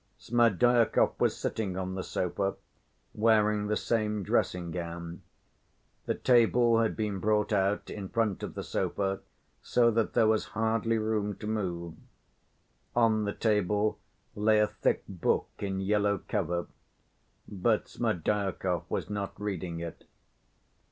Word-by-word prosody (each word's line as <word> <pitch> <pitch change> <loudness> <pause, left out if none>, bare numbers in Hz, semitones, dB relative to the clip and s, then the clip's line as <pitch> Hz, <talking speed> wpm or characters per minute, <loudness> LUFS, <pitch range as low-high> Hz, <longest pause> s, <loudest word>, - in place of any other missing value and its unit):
Smerdyakov 120 0 +3
was - - +2
sitting 100 -5 -2
on 95 0 -3
the 95 -1 -3
sofa, 95 +2 -1 0.6
wearing 105 -1 +3
the 105 0 +1
same 105 -3 -1
dressing‐gown. 85 0 -2 0.9
The - - +1
table 120 -1 +4
had 115 -1 +1
been 105 -3 -2
brought 105 +1 +1
out 100 +1 0
in 100 -3 -6
front 110 -4 0
of - - -6
the - - -4
sofa, 95 -1 -1 0.4
so 120 -1 +3
that 115 0 0
there 115 - +4
was 110 0 +2
hardly 115 +1 +1
room 110 -2 -1
to - - -9
move. 90 -6 -3 1.0
On 110 -3 +3
the 100 - -2
table 105 -1 +1 0.3
lay 110 +1 +3
a 105 - +5
thick - - -1
book 95 -4 0
in 95 -2 -2
yellow 100 0 +1
cover, 90 -5 -1 0.8
but 105 +3 0
Smerdyakov 95 -3 -1
was - - -2
not 100 -1 -4
reading 90 -5 -4
it. 85 -1 -7
105 Hz, 130 wpm, -29 LUFS, 95-110 Hz, 1.0 s, a